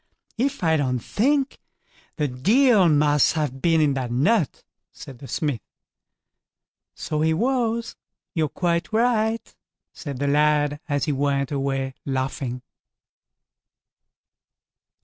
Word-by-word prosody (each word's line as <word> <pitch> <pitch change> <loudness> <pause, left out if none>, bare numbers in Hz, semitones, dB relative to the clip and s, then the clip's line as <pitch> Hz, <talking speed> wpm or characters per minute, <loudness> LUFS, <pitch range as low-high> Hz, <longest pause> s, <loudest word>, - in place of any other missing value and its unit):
if 275 -3 -1
I 160 -1 +3
don't 130 -3 0
think 270 - 0 0.6
the 150 -3 0
Deil 200 - +4
must 150 -1 +3
have 150 -5 -3
been 165 -1 +3
in 150 -2 +3
that 130 -2 -3
nut", 155 - +1 0.3
said 130 -3 -12
the 135 - -10
smith. 145 -8 -2 1.3
"So 150 0 -3
he 160 0 +2
was; 235 +1 -1 0.4
you're 155 -3 0
quite 170 +3 -1
right", 225 0 0 0.4
said 140 -5 -7
the 145 - -2
lad, 150 0 +2
as 145 -2 0
he 155 - 0
went 140 0 0
away 135 -1 -2
laughing. 130 -2 -3
150 Hz, 115 wpm, -23 LUFS, 135-210 Hz, 1.3 s, Deil